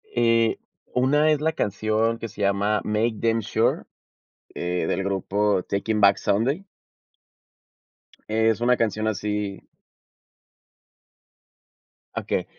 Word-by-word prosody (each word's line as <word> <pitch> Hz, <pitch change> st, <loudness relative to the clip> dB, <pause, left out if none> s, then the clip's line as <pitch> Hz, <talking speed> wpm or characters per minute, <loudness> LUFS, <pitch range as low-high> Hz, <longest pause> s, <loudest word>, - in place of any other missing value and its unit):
Eh, 115 Hz, -1 st, +3 dB, 0.3 s
una 145 Hz, +5 st, +3 dB
es 150 Hz, -1 st, +1 dB
la 160 Hz, +1 st, +1 dB
canción 110 Hz, -1 st, 0 dB
que 115 Hz, -, -4 dB
se 105 Hz, -1 st, -10 dB
llama 100 Hz, +2 st, +1 dB
MakeDamnSure, 115 Hz, 0 st, 0 dB, 0.7 s
eh, 90 Hz, -1 st, -2 dB
del 95 Hz, -, -1 dB
grupo 100 Hz, 0 st, 0 dB
Taking 105 Hz, +2 st, -1 dB
Back 100 Hz, 0 st, +6 dB
Sunday. 135 Hz, -, 0 dB, 1.6 s
Es 110 Hz, 0 st, +2 dB
una 125 Hz, +1 st, +4 dB
canción 110 Hz, -1 st, 0 dB
así 105 Hz, -1 st, -3 dB, 2.5 s
Okey. -, -, -2 dB
110 Hz, 95 wpm, -24 LUFS, 100-115 Hz, 2.5 s, Back